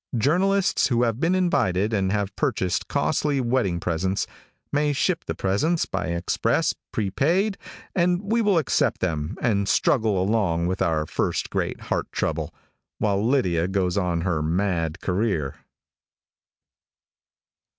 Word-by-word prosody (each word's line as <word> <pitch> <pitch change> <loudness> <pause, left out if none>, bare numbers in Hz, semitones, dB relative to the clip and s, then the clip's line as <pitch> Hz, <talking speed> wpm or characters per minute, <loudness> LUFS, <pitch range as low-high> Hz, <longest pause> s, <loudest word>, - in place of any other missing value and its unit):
Journalists 185 - +2
who 120 -2 +2
have 115 -1 0
been 170 +5 +2
invited, 115 - +1
and 95 -2 +1
have 100 -1 -1
purchased 90 -2 -1
costly 145 -2 0
wedding 120 -8 0
presents, 90 +3 -1 0.5
may 145 0 +1
ship 170 +4 0
the - - -3
presents 150 - +1
by 95 -3 -3
express, 85 +1 0 0.2
prepaid, 165 - +1 0.4
and 175 0 +2
we 225 +3 +1
will 205 -4 +3
accept 145 -4 +1
them, 80 0 -2
and 100 -4 +1
struggle 110 -7 +2
along 95 -4 +1
with 95 +2 -2
our 80 -2 +1
first - - -2
great - - -2
heart - - -2
trouble, - - -2 0.5
while 100 -1 +1
Lydia 95 -10 +2
goes 95 -2 0
on 90 -4 0
in - - -4
her 85 -5 0
mad 85 -1 -1
career. 90 -8 -1
100 Hz, 135 wpm, -24 LUFS, 90-145 Hz, 0.5 s, will